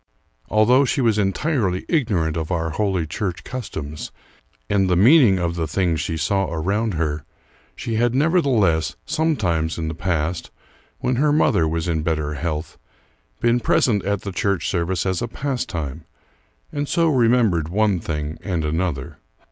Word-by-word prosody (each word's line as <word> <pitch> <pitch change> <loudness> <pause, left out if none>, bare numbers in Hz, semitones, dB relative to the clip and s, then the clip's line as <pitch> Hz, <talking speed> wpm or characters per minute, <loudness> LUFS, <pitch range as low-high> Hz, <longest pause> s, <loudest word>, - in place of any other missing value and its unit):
Although 120 +6 +4
she 140 - 0
was 115 -4 +2
entirely 100 - 0
ignorant 100 - +1
of 80 +1 -3
our 80 -2 -1
holy 95 -1 0
church 90 +2 -4
customs 80 - -6 0.6
and 95 -2 +2
the 90 - +3
meaning 115 - +6
of 85 -2 -1
the 85 -2 -2
things 85 0 0
she 80 - -3
saw 95 +4 0
around 100 +6 -1
her, 75 -2 -1 0.5
she 115 -2 -3
had 120 +1 +2
nevertheless, 135 - +2
sometimes 95 - 0
in 80 -1 -2
the - - -4
past, 85 0 -2 0.5
when 125 -1 0
her 145 +2 +3
mother 85 - +3
was 80 +2 -2
in 80 -2 0
better 75 -2 -1
health, 75 +2 -4 0.6
been 120 +1 +3
present 110 -2 +2
at 100 -1 -1
the 100 - -5
church 100 -2 -1
service 90 0 -1
as 95 -2 -1
a 120 - -1
pastime, 85 - -4 0.7
and 145 0 -2
so 170 -1 +2
remembered 115 - +3
one 100 0 +2
thing 75 -1 -4
and 85 -6 -2
another. 75 -2 -2
95 Hz, 155 wpm, -22 LUFS, 80-115 Hz, 0.7 s, meaning